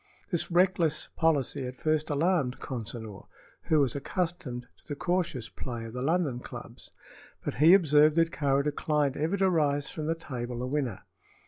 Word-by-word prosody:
This 175 Hz, -, 0 dB
reckless 175 Hz, -3 st, +2 dB
policy 145 Hz, -4 st, +1 dB
at 125 Hz, +1 st, -8 dB
first 155 Hz, -1 st, 0 dB
alarmed 145 Hz, -3 st, +1 dB
Consinor, 115 Hz, -4 st, -6 dB, 0.4 s
who 155 Hz, -, +3 dB
was 135 Hz, -3 st, +2 dB
accustomed 140 Hz, -5 st, -3 dB
to -, -, -26 dB
the 145 Hz, -, -4 dB
cautious 170 Hz, -8 st, -1 dB
play 120 Hz, -3 st, -6 dB
of 115 Hz, -, -8 dB
the 125 Hz, -, -4 dB
London 150 Hz, -3 st, +1 dB
clubs; -, -, -10 dB, 0.6 s
but -, -, -1 dB
he 165 Hz, +5 st, +9 dB
observed 150 Hz, -4 st, +5 dB
that 165 Hz, 0 st, +3 dB
Kāra 140 Hz, -3 st, +1 dB
declined 150 Hz, -1 st, 0 dB
ever 160 Hz, +7 st, 0 dB
to 190 Hz, 0 st, +3 dB
rise 145 Hz, -5 st, +1 dB
from 155 Hz, -1 st, -4 dB
the 165 Hz, -, +1 dB
table 125 Hz, -6 st, -5 dB
a -, -, -1 dB
winner. 130 Hz, -9 st, -2 dB
145 Hz, 165 wpm, -29 LUFS, 125-165 Hz, 0.6 s, he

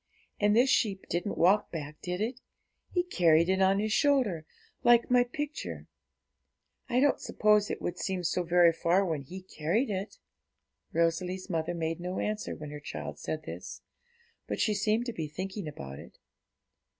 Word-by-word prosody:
And 205 Hz, 0 st, +3 dB
this 250 Hz, +3 st, +5 dB
sheep 195 Hz, -4 st, +1 dB
didn't 175 Hz, +4 st, -2 dB
walk 200 Hz, +4 st, +4 dB
back; 150 Hz, -2 st, -6 dB
did 180 Hz, +2 st, -3 dB
it? 240 Hz, +4 st, -2 dB, 0.5 s
He 355 Hz, -, +1 dB
carried 170 Hz, -, +3 dB
it 190 Hz, 0 st, +2 dB
on 190 Hz, +1 st, +4 dB
His 215 Hz, +1 st, 0 dB
shoulder, 245 Hz, -, +2 dB, 0.4 s
like 240 Hz, 0 st, +5 dB
my 245 Hz, 0 st, +6 dB
picture; 245 Hz, -, -5 dB, 1.0 s
I 245 Hz, -, +2 dB
don't 285 Hz, +1 st, +3 dB
suppose 210 Hz, -1 st, +2 dB
it -, -, -4 dB
would 175 Hz, 0 st, -3 dB
seem 190 Hz, -2 st, -2 dB
so 180 Hz, +2 st, 0 dB
very 175 Hz, -1 st, +5 dB
far 175 Hz, +4 st, +2 dB
when 160 Hz, -5 st, -2 dB
He 180 Hz, +7 st, -9 dB
carried 185 Hz, -, -1 dB
it.' 195 Hz, +2 st, -4 dB, 0.7 s
Rosalie's 180 Hz, +3 st, 0 dB
mother 165 Hz, +1 st, -1 dB
made 165 Hz, 0 st, -2 dB
no 180 Hz, +1 st, -4 dB
answer 215 Hz, 0 st, -2 dB
when 150 Hz, -1 st, -8 dB
her 150 Hz, -, -7 dB
child 145 Hz, -, -6 dB
said -, -, -4 dB
this, -, -, -8 dB, 0.6 s
but -, -, -3 dB
she 215 Hz, -, +2 dB
seemed 215 Hz, +3 st, +1 dB
to 240 Hz, -, -3 dB
be 160 Hz, -6 st, -4 dB
thinking 190 Hz, +4 st, -5 dB
about 70 Hz, -, -8 dB
it. -, -, -13 dB
185 Hz, 170 wpm, -30 LUFS, 165-215 Hz, 1.0 s, my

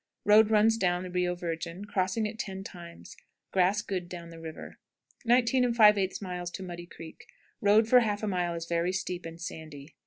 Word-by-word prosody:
Road 210 Hz, +1 st, +6 dB
runs 220 Hz, +1 st, +4 dB
down 180 Hz, -3 st, 0 dB
the 180 Hz, -, -7 dB
Rio 180 Hz, 0 st, 0 dB
Virgin, 170 Hz, +2 st, -5 dB
crossing 195 Hz, +2 st, -1 dB
it 215 Hz, +1 st, -5 dB
ten 190 Hz, -1 st, -5 dB
times. 170 Hz, -3 st, -11 dB, 0.4 s
Grass 195 Hz, +3 st, +2 dB
good 180 Hz, -4 st, -4 dB
down 170 Hz, -2 st, -8 dB
the 165 Hz, -, -11 dB
river. 160 Hz, -1 st, -9 dB, 0.5 s
19 245 Hz, 0 st, +3 dB
5/8. 190 Hz, -5 st, +2 dB
Muddy 175 Hz, -1 st, -8 dB
Creek. 165 Hz, -2 st, -12 dB, 0.3 s
Road 215 Hz, +1 st, +4 dB
for 250 Hz, +2 st, +7 dB
half 210 Hz, -3 st, -1 dB
a -, -, 0 dB
mile 175 Hz, -3 st, -1 dB
is 165 Hz, 0 st, -5 dB
very 170 Hz, +2 st, 0 dB
steep 180 Hz, -2 st, -4 dB
and 165 Hz, 0 st, -10 dB
sandy. 155 Hz, -3 st, -9 dB
185 Hz, 175 wpm, -29 LUFS, 170-210 Hz, 0.5 s, for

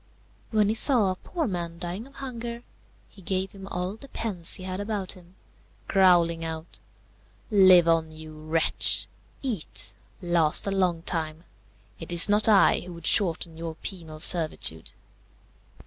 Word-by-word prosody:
When 215 Hz, -2 st, +1 dB
he -, -, +1 dB
saw 225 Hz, -4 st, +4 dB
a -, -, -4 dB
poor 325 Hz, -, -5 dB
man 170 Hz, -6 st, -5 dB
dying 180 Hz, +7 st, -6 dB
of 275 Hz, -, -20 dB
hunger, 235 Hz, -3 st, -7 dB, 0.4 s
he 195 Hz, -, -18 dB
gave 190 Hz, +1 st, -3 dB
him 195 Hz, -1 st, -12 dB
all 180 Hz, +2 st, -4 dB
the 275 Hz, -, -13 dB
pence 185 Hz, -10 st, -3 dB
he 185 Hz, -, -8 dB
had 185 Hz, 0 st, -5 dB
about 205 Hz, -2 st, -4 dB
him, 180 Hz, -1 st, -15 dB, 0.5 s
growling 175 Hz, -4 st, +2 dB
out, 160 Hz, 0 st, -7 dB, 0.7 s
"Live 185 Hz, -4 st, +6 dB
on, 165 Hz, -1 st, +1 dB
you 155 Hz, 0 st, -11 dB
wretch! 155 Hz, +1 st, +1 dB, 0.4 s
eat! 225 Hz, -, -2 dB, 0.3 s
last 170 Hz, -4 st, +2 dB
a 200 Hz, -, -2 dB
long 180 Hz, -4 st, -1 dB
time! 160 Hz, -2 st, -4 dB, 0.6 s
It 165 Hz, -, -4 dB
is 170 Hz, -1 st, +8 dB
not 210 Hz, +2 st, +2 dB
I 205 Hz, -2 st, +4 dB
who 180 Hz, 0 st, -10 dB
would 170 Hz, -1 st, -11 dB
shorten 170 Hz, -4 st, +3 dB
your 165 Hz, -1 st, -7 dB
penal 160 Hz, -3 st, -8 dB
servitude." 155 Hz, -, +2 dB
180 Hz, 150 wpm, -25 LUFS, 165-205 Hz, 0.7 s, is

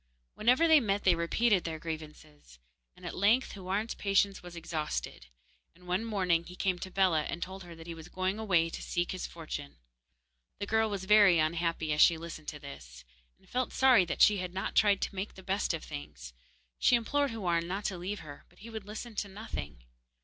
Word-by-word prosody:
Whenever 250 Hz, +9 st, +3 dB
they 320 Hz, -2 st, +7 dB
met 205 Hz, -5 st, 0 dB
they 185 Hz, -, +5 dB
repeated 185 Hz, +4 st, +2 dB
their 165 Hz, -1 st, -4 dB
grievances, 155 Hz, -, -9 dB, 0.4 s
and -, -, -13 dB
at -, -, -5 dB
length 220 Hz, +7 st, +3 dB
Houarn's 200 Hz, +3 st, -3 dB
patience 200 Hz, 0 st, +1 dB
was 175 Hz, -1 st, -10 dB
exhausted, 160 Hz, -, -4 dB, 0.5 s
and 180 Hz, +1 st, -19 dB
one 180 Hz, +4 st, 0 dB
morning 185 Hz, -7 st, +1 dB
he 180 Hz, +1 st, -11 dB
came 185 Hz, -1 st, 0 dB
to 190 Hz, -, -6 dB
Bellah 180 Hz, -5 st, +2 dB
and 170 Hz, -, -4 dB
told 190 Hz, +2 st, -6 dB
her 170 Hz, -1 st, -11 dB
that 165 Hz, 0 st, -12 dB
he 170 Hz, -, -6 dB
was 160 Hz, -1 st, -10 dB
going 185 Hz, +3 st, -2 dB
away 175 Hz, -7 st, +2 dB
to -, -, -6 dB
seek 175 Hz, 0 st, -1 dB
his 185 Hz, -, -4 dB
fortune. 155 Hz, -3 st, -7 dB, 0.8 s
The -, -, -3 dB
girl 220 Hz, +1 st, +2 dB
was 195 Hz, -2 st, -4 dB
very 205 Hz, -3 st, +6 dB
unhappy 160 Hz, 0 st, 0 dB
as 150 Hz, -, +2 dB
she 165 Hz, -, +7 dB
listened 165 Hz, -2 st, -8 dB
to 150 Hz, -, -4 dB
this, 65 Hz, -, -11 dB, 0.3 s
and -, -, -26 dB
felt 255 Hz, 0 st, -2 dB
sorry 255 Hz, -7 st, +6 dB
that -, -, +2 dB
she 210 Hz, -1 st, +6 dB
had 180 Hz, 0 st, -5 dB
not 190 Hz, -, -2 dB
tried 205 Hz, -2 st, +4 dB
to -, -, -2 dB
make 195 Hz, +2 st, -5 dB
the 190 Hz, -, -12 dB
best 195 Hz, +2 st, 0 dB
of 165 Hz, -3 st, -4 dB
things. 70 Hz, -4 st, -8 dB, 0.5 s
She 250 Hz, -, +5 dB
implored 285 Hz, +5 st, +1 dB
Houarn 175 Hz, -7 st, -1 dB
not 195 Hz, +3 st, -4 dB
to 190 Hz, -, -1 dB
leave 195 Hz, +3 st, -4 dB
her, 145 Hz, -2 st, -11 dB
but -, -, -25 dB
he 230 Hz, +3 st, -11 dB
would 220 Hz, -3 st, -6 dB
listen 220 Hz, +2 st, -7 dB
to 205 Hz, -, -1 dB
nothing. 190 Hz, -, -7 dB
185 Hz, 210 wpm, -31 LUFS, 165-205 Hz, 0.8 s, they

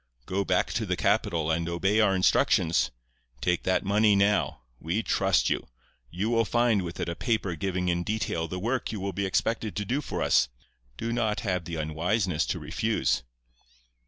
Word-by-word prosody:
Go 95 Hz, +6 st, -1 dB
back 90 Hz, -1 st, +1 dB
to 110 Hz, -2 st, -1 dB
the 90 Hz, -, 0 dB
capital 100 Hz, -6 st, +1 dB
and 85 Hz, +1 st, -1 dB
obey 95 Hz, +5 st, +1 dB
our 100 Hz, -3 st, +4 dB
instructions. 85 Hz, -3 st, +3 dB, 0.5 s
Take 90 Hz, +6 st, 0 dB
that 95 Hz, -, +2 dB
money 105 Hz, +1 st, +4 dB
now. 100 Hz, -5 st, +2 dB, 0.2 s
We 90 Hz, +8 st, -1 dB
trust -, -, +2 dB
you. -, -, -1 dB, 0.4 s
You 95 Hz, -, -2 dB
will 115 Hz, -1 st, +3 dB
find 120 Hz, -2 st, +2 dB
with 85 Hz, -1 st, -6 dB
it -, -, -2 dB
a 85 Hz, -, -3 dB
paper 110 Hz, -6 st, -1 dB
giving 90 Hz, +1 st, -2 dB
in 85 Hz, 0 st, +1 dB
detail 85 Hz, -4 st, -2 dB
the 90 Hz, -, -5 dB
work 120 Hz, +7 st, -1 dB
you 110 Hz, -, -4 dB
will 100 Hz, 0 st, -3 dB
be 100 Hz, +2 st, -1 dB
expected 110 Hz, +2 st, -1 dB
to 105 Hz, -, -2 dB
do 130 Hz, +8 st, -1 dB
for -, -, -3 dB
us. 60 Hz, -, +3 dB, 0.5 s
Do 115 Hz, 0 st, -2 dB
not 110 Hz, -3 st, 0 dB
have 90 Hz, -5 st, -1 dB
the 85 Hz, -, -5 dB
unwiseness 85 Hz, +3 st, 0 dB
to -, -, -1 dB
refuse. 85 Hz, +4 st, 0 dB
95 Hz, 185 wpm, -27 LUFS, 85-110 Hz, 0.5 s, our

